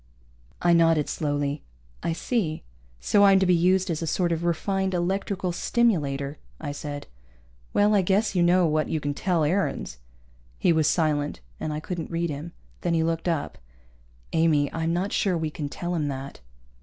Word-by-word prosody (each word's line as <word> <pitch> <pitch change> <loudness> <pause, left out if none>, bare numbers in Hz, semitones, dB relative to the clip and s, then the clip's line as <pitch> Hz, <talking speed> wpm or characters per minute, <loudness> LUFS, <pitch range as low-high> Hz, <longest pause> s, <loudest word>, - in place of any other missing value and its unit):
I 175 0 +5
nodded 165 -3 +4
slowly. 145 -1 -2 0.4
"I 165 - -1
see. 170 -3 -2 0.4
So 205 -1 +3
I'm 195 -1 +7
to 190 - +3
be 180 - +4
used 185 +2 +3
as 160 - -2
a 165 - -2
sort 175 +2 +1
of 165 0 -1
refined 190 +3 0
electrical 185 +1 -1
stimulator," 150 -10 0 0.2
I 145 -2 -4
said. 145 0 -6 0.7
"Well, 205 +1 +3
I 200 - +5
guess 195 +4 +1
you 180 - +2
know 175 +1 +4
what 155 -1 +1
you 160 - 0
can 145 -1 -2
tell 170 +1 0
Aarons." 150 - -1 0.6
He 170 - +3
was 160 -2 +2
silent, 150 - +1 0.2
and 155 - -3
I 150 - -3
couldn't 170 +1 -5
read 170 -1 -1
him. 150 +4 -6 0.3
Then 170 -1 0
he 160 - +2
looked 165 +1 -1
up. 165 -4 -2 0.7
"Amy, 155 -3 +2
I'm 165 0 -1
not 180 +4 -1
sure 185 -4 +1
we 160 -1 -2
can 150 -3 -4
tell 175 +4 -4
him 155 -4 0
that." 135 0 -6
165 Hz, 180 wpm, -25 LUFS, 150-180 Hz, 0.7 s, I'm